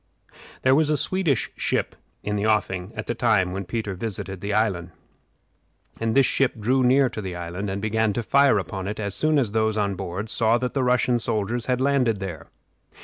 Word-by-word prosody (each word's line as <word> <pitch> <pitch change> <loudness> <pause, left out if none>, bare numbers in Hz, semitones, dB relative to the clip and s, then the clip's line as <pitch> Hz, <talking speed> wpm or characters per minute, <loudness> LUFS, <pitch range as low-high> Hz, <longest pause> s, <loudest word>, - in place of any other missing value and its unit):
There 130 - +5
was 155 +2 +3
a 150 - +2
Swedish 170 -10 0
ship - - -1 0.3
in 105 - -2
the 105 +1 0
offing 95 -3 0
at - - -5
the - - -2
time 110 -6 +2
when 95 +1 -4
Peter 105 +2 -3
visited 95 -1 -5
the 100 - -3
island, 100 -5 0 1.1
and 115 -1 -1
this 135 -1 +6
ship 135 -2 +1
drew 125 +5 +2
near 130 +2 +4
to 110 - -6
the 95 -3 -5
island 90 +4 -5
and 95 +1 -3
began 110 0 +1
to 120 - -2
fire 140 -1 +4
upon 95 0 -4
it 105 +2 -4
as 100 -2 -2
soon 155 +4 +1
as 120 -7 +1
those 110 0 +1
on 100 -2 0
board 95 +2 -5
saw 115 0 +3
that 125 +1 -3
the 135 - 0
Russian 125 -1 +2
soldiers 115 +1 0
had 125 -1 +1
landed 130 -6 +2
there. 90 -6 -6
110 Hz, 205 wpm, -24 LUFS, 100-125 Hz, 1.1 s, this